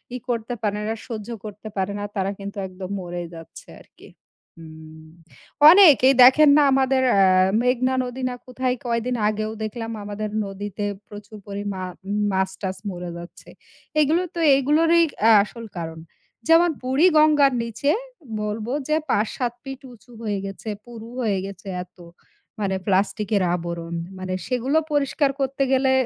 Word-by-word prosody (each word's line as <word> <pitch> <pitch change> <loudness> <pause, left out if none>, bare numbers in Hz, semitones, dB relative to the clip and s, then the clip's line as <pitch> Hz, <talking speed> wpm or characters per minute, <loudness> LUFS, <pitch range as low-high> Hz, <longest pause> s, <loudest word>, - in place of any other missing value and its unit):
ই - - -2
করতে 235 0 -2
পারে 210 0 -1
না, 220 - -1
সহ্য 220 -3 -6 0.2
করতে 210 +1 -9
পারে 190 +1 -1
না - - -4
তারা 195 0 -1
কিন্তু 200 +1 -7
একদম 185 0 -9
মরেই 175 -1 -6
যাচ্ছে 165 0 -12
আরকি। - - -18 0.5
হুম। 160 -1 -13 0.6
অনেক 360 -7 +8
এই - - +6
দেখেন 285 +4 +7
না 295 - +6
আমাদের 265 0 +2 0.2
আ - - +5 0.4
মেঘনা 255 +1 +1
নদী 250 +1 -7
না 250 - -5
কোথায় 255 0 -1
কয়দিন 235 +1 -1
আগেও 215 0 -2
দেখলাম 225 +1 -5
আমাদের 210 +1 -5 0.2
নদীতে 205 +1 -5 0.2
প্রচুর 210 +1 -11
পরিমা 200 -1 -5 0.5
মাছ 190 0 0
টাছ 190 -1 -3
মরে 180 -2 -6
যাচ্ছে। 170 0 -12 0.5
এগুলো 310 +4 +2
তো - - -3 0.2
এগুলোরই 325 +5 +3 0.2
আ - - +7
আসল 230 +2 -9
কারণ। 160 -1 -6 0.5
যেমন 335 +1 +6
বুড়িগঙ্গার 300 0 +4
নিচে 235 +6 -1 0.5
বলব 210 +1 -4 0.2
যে 305 - +2
৫, 210 +1 +2
৭ 245 -2 -1
ফিট 270 -1 -8
উঁচু 240 +1 -19
হয়ে 205 -3 -2
গেছে, 195 +3 -7 0.2
পুরু 230 -2 -10
হয়ে 210 -5 0
গেছে 195 0 -10 0.2
এত। 185 - -26 0.6
মানে 195 -2 -1
প্লাস্টিকের 200 +1 +1
আবরণ। 170 -1 -5 0.2
মানে 185 0 -4
সেগুলো 255 +4 0
পরিষ্কার 285 0 +1
করতে 270 0 0
গেলে, 265 0 +3
220 Hz, 150 wpm, -23 LUFS, 195-265 Hz, 0.6 s, অনেক